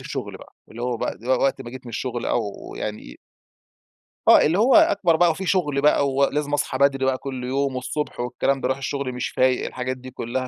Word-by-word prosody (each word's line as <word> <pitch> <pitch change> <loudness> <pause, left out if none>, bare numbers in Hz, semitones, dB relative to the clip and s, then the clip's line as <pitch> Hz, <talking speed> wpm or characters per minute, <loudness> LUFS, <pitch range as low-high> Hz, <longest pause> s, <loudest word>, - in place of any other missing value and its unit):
الشغل - - -6
بقى، - - -16 0.2
اللي 115 +2 -8
هو 125 -1 -1
بقى - - -3
و 125 - -4
وقت 135 -1 +1
ما 120 - -9
جيت 130 0 -10
من - - -7
الشغل 120 +1 -3
أو 120 - +1 0.3
يعني 105 0 -6 1.1
آه، - - +8
اللي 170 +6 +2
هو 250 +4 +5
أكبر 320 - +4
بقى 175 0 +4
وفي 190 +4 -5
شغل 150 -7 +1
بقى 145 -1 +3
ولازم 145 +2 0
أصحى 135 -2 -1
بدري 135 -1 +2
بقى 130 -1 +1
كل 130 -2 -6
يوم 135 +1 -1
والصبح 135 +3 -4
والكلام 130 +2 -1
باروح 130 +1 0
الشغل 140 -1 -3
مش 125 0 -3
فايق، 130 -1 +1
الحاجات 130 0 -4
دي 130 0 -11
كلها 130 +1 -4
135 Hz, 205 wpm, -23 LUFS, 125-145 Hz, 1.1 s, آه